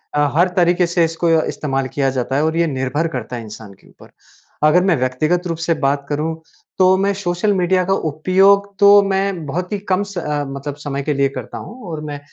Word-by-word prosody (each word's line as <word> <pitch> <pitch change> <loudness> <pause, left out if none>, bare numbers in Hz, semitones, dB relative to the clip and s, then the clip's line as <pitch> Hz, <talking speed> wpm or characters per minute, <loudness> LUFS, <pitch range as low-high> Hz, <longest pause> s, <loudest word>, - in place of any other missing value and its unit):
अ, 145 0 +2
हर 175 +3 +4
तरीके 175 0 +3
से 170 0 +1
इसको 165 +1 -1
इस्तेमाल 135 -4 -2
किया 135 -2 +1
जाता 130 0 -2
है 145 - +2
और 160 +1 -1
ये 170 -1 +2
निर्भर 135 +3 -1
करता 125 +1 -6
है, 120 - -5
इंसान 105 -1 -11
के - - -23
ऊपर। - - -18 0.5
अगर 170 +4 +5
मैं 190 -3 +3
व्यक्तिगत 155 +8 0
रूप 165 - -3
से 170 - +3
बात 140 0 0
करूँ, 155 +2 -2 0.4
तो 185 0 +5
मैं 200 +1 +1
सोशल 190 +1 -1
मीडिया 185 0 +1
का 195 - +1
उपयोग 195 +5 +2
तो 205 0 +7
मैं 195 -3 -1
बहुत 180 +7 -4
ही 205 - -2
कम 190 +2 +1
स 200 -2 -9
अ, 150 -3 -2
मतलब 140 +1 -6
समय 140 -1 -3
के 150 +1 -1
लिए 140 0 +1
करता 140 - -7
हूँ 235 +8 -10
और 155 - -5
मैं 145 - -6
165 Hz, 220 wpm, -18 LUFS, 140-185 Hz, 0.5 s, तो